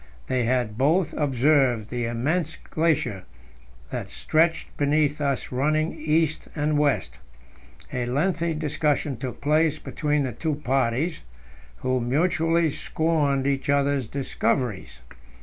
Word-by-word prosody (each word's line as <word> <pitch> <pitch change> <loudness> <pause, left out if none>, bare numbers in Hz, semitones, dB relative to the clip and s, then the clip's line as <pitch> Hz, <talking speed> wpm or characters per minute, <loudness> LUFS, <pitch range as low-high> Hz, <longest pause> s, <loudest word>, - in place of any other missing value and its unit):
They 125 -2 0
had 120 -3 0
both 160 +6 +2
observed 135 -5 +2
the 120 -1 -1
immense 150 +8 -1
glacier 150 - -1 0.7
that - - -4
stretched 160 +1 0
beneath 145 0 +1
us 140 -2 -1
running 155 +5 +1
east 155 0 0
and 150 -1 +1
west. 145 -2 0 0.7
A 125 -1 -1
lengthy 165 +5 0
discussion 150 -2 0
took 125 +2 -6
place 155 +1 +2
between 150 -2 -1
the 130 - -2
two 155 +6 -2
parties, 135 +3 0 0.6
who 130 0 +1
mutually 165 +4 +2
scorned 150 -3 0
each 140 0 -1
other's 140 -3 +2
"discoveries." 125 -4 -2
145 Hz, 115 wpm, -25 LUFS, 130-155 Hz, 0.7 s, both